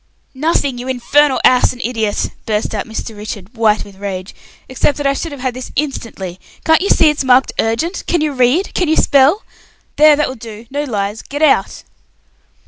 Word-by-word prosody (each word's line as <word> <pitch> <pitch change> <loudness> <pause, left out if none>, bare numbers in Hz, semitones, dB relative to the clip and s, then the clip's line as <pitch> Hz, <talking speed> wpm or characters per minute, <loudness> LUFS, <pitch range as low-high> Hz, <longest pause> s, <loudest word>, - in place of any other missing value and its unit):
"Nothing, 280 -3 0
you 250 - -6
infernal 265 +2 +2
ass 250 0 +4
and 250 - -10
idiot," 225 -4 -1 0.2
burst 215 0 -1
out 210 - -3
Mr. 220 0 -6
Richard, 210 +1 -8
white 220 -2 +2
with 200 -2 -15
rage, 190 -1 -5 0.3
"except 260 +2 0
that 290 - -4
I 275 - +3
should 325 +3 -4
have 280 -3 -8
had 255 -1 -1
this 255 +1 -8
instantly. 225 -10 -4 0.3
Can't 320 +1 +4
you 400 - -1
see 310 - +5
it's 300 - -3
marked 260 0 +4
urgent? 275 +12 -1
Can 345 - +1
you 305 -1 0
read? 260 +8 +1
Can 360 - 0
you 315 - +2
spell? 285 - +4 0.5
There, 300 0 +7
that 300 +1 0
will - - -5
do. 225 -2 -10
No 290 +2 -2
lies. 210 -3 -3
Get 290 +2 -4
out!" 295 - +2
255 Hz, 195 wpm, -16 LUFS, 220-295 Hz, 0.5 s, There